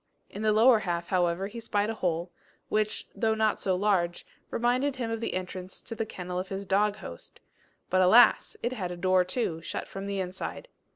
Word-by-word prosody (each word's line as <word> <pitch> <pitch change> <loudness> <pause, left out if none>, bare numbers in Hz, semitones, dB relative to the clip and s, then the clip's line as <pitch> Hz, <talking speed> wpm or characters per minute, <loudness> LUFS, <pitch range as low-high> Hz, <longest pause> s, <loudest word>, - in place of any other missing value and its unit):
In 205 - -6
the 215 0 +3
lower 225 +2 +6
half, 170 -4 -3
however, 180 0 +1
he 215 +4 -7
spied 210 -1 0
a - - -3
hole, 175 -4 -2 0.4
which, 215 0 0
though 220 -2 +1
not 220 -1 +1
so 190 -2 +1
large, 180 -3 +1 0.2
reminded 255 +4 +1
him 240 -3 -3
of 225 0 -3
the 230 - -2
entrance 185 0 -5
to - - -6
the 225 -1 -3
kennel 180 -2 -5
of 185 - -4
his 195 0 -4
dog 205 +2 +2
host; 175 - -10 0.5
but 185 0 +4
alas! 220 +7 +6
it 240 +2 0
had 190 -8 -3
a 175 - -6
door 185 +1 +3
too, 180 -4 -2
shut - - -5
from 195 0 -6
the 200 -1 -2
inside. 190 - -5
195 Hz, 205 wpm, -28 LUFS, 180-220 Hz, 0.5 s, lower